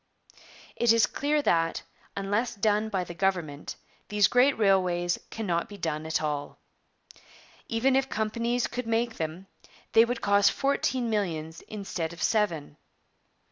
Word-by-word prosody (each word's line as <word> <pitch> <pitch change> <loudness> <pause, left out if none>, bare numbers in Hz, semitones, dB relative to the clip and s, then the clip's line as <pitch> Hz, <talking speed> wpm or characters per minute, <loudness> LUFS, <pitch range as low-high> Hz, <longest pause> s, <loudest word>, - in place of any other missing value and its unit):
'It 235 -1 +4
is 230 -1 +5
clear 295 +1 0
that, 165 -6 +1 0.3
unless 205 +5 -1
done 210 +1 +1
by 190 -3 -1
the 175 - -8
government, 170 -6 -2 0.3
these 210 -1 +4
great 255 +2 +4
railways 180 -4 +2
cannot 195 -2 -2
be 205 - -9
done 160 -3 -3
at 160 0 0
all. 145 -1 -3 1.1
Even 250 +4 +2
if 270 0 +1
companies 235 +3 -1
could 250 -1 -4
make 230 0 0
them, 160 +4 -4 0.5
they 225 - +7
would 235 +1 -2
cost 200 0 +4
fourteen 265 -3 0
millions 165 -7 -2
instead 195 -6 -4
of 165 -2 -6
seven. 165 -10 0
205 Hz, 140 wpm, -27 LUFS, 170-230 Hz, 1.1 s, they